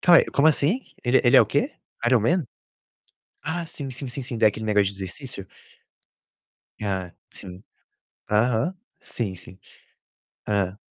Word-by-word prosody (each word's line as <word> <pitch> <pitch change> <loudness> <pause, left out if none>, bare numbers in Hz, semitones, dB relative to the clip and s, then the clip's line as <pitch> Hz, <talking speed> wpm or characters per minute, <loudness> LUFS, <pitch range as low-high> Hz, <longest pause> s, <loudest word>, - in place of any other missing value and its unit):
Cai 175 -1 +7
como 145 +3 +4
assim? 160 - +2 0.2
Ele, 125 +1 +4
ele 120 - +6
é - - +10
o - - +4
quê? - - 0 0.3
Ironman? 130 - +3 1.0
Ah, 165 +3 -2
sim, 145 -4 -7
sim, 130 +2 -6
sim, 130 +2 -5
sim, 125 -1 -5
da 110 - +5
aquele 110 +1 -5
negócio 105 -2 +3
de - - -5
exercício? 100 +1 -7 1.3
Ah, 95 -3 -2 0.2
sim. 90 0 -10 0.7
Aham. 120 - +2 0.2
Sim, 105 -6 -4
sim. 95 +1 -13 0.9
Hã. 100 -2 0
120 Hz, 140 wpm, -24 LUFS, 100-140 Hz, 1.3 s, é